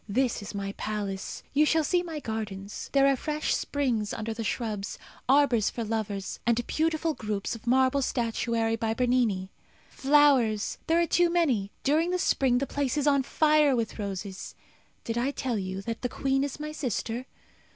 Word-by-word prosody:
This 245 +2 +1
is 205 +1 -7
my 200 0 -3
palace. 200 -3 -4
You 290 +2 +5
shall 315 +1 +3
see 355 +4 +2
my 330 -3 -5
gardens. 210 -5 -5
There 275 -1 +4
are 275 0 +4
fresh 300 +3 -1
springs 245 -8 -1
under 220 +1 -3
the 225 +1 -4
shrubs; 215 -3 -3 0.3
arbours 260 -6 +4
for 235 - -4
lovers; 210 -3 -3
and 235 0 +1
beautiful 320 0 0
groups 210 -5 -3
of 230 0 -10
marble 260 +2 +3
statuary 230 -2 0
by 225 -1 -1
Bernini. 235 -7 +1 0.4
Flowers! 270 -7 +3
there 330 +1 +3
are 340 - +3
too 350 +1 +3
many 275 - +1
during 315 +5 +2
the 365 - +1
spring 265 -8 +2
the 275 - 0
place 280 -1 -1
is 290 - +1
on 280 -2 +4
fire 300 0 +3
with 230 -2 -2
roses. 195 -1 -5 0.5
Did 230 +1 -2
I 255 +3 +1
tell 255 -5 -2
you 190 0 -4
that 230 +1 -4
the 250 - -1
queen 270 +1 0
is 285 0 -4
my 305 0 -4
sister? 250 -3 -3
245 Hz, 175 wpm, -28 LUFS, 215-285 Hz, 0.5 s, You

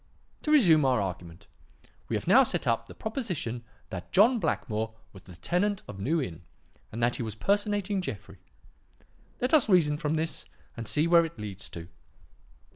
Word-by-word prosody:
"To 305 - -1
resume 175 - +6
our 130 -3 +3
argument. 90 -1 -5 0.6
We - - 0
have - - -3
now - - +7
set - - 0
up 115 0 0
the - - -12
proposition 180 - -4 0.3
that 90 -2 -7
John 225 +6 +5
Blackmore 110 - -2 0.2
was 95 - -12
the 90 -2 -14
tenant 195 - -1
of 100 - -9
New 155 +12 0
Inn 90 - -5 0.5
and 115 +2 -3
that 120 +1 +2
he - - -4
was 110 -3 -4
personating 205 - 0
Jeffrey. 100 - -7 1.0
Let 250 +5 0
us 290 -8 +5
reason 150 -6 +4
from 155 -1 -1
this 160 +1 -3 0.3
and 115 -2 -6
see 150 +1 +2
what 170 0 +5
it 165 -3 -9
leads 100 -2 -6
to. 85 -1 -9
150 Hz, 175 wpm, -28 LUFS, -, 1.0 s, now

